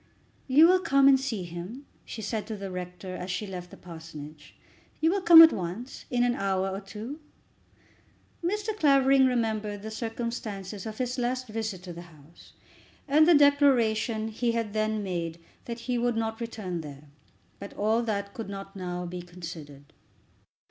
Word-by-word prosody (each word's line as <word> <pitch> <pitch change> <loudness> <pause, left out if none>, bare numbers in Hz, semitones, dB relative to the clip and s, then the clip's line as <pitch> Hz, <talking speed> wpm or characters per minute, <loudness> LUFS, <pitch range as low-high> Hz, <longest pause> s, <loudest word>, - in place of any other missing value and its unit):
"You 285 +4 +7
will 370 +1 +5
come 275 -7 +4
and 270 -1 +6
see 235 -8 -3
him?" 175 +11 -8 0.2
she 220 - -7
said 210 0 -3
to 220 -1 -5
the 195 -1 -6
rector, 180 +1 -6
as 180 +1 -6
she 185 +3 -2
left 180 -2 -7
the - - -13
parsonage. 155 -3 -11 0.4
"You 320 +1 +3
will 395 +1 0
come 335 -2 +11
at 325 - +7
once; 190 +9 -6
in 245 -1 +1
an 245 0 +2
hour 195 -5 -1
or 195 +1 -4
two?" 215 +9 -8 1.2
Mr. 420 +4 -1
Clavering 275 -5 +5
remembered 215 -4 -1
the 220 - -6
circumstances 220 -4 -5
of 215 0 -7
his 250 0 -2
last 250 +1 -1
visit 215 -4 -4
to 180 -2 -7
the 170 - -8
house, 155 +1 -18 0.5
and 305 +3 +5
the 345 - +7
declaration 245 -6 +3
he 230 +2 -1
had 230 -3 -2
then 215 -1 0
made 170 -3 -3 0.3
that 235 0 -6
he 245 0 -1
would 240 0 +1
not 225 0 -2
return 205 -7 -4
there. 145 -2 -10 0.6
But 200 - -9
all 220 +3 +1
that 200 -3 -3
could 225 -3 -6
not 195 0 -8
now 180 -1 -4
be 175 +1 -6
considered. 165 -5 -10
215 Hz, 170 wpm, -28 LUFS, 180-250 Hz, 1.2 s, come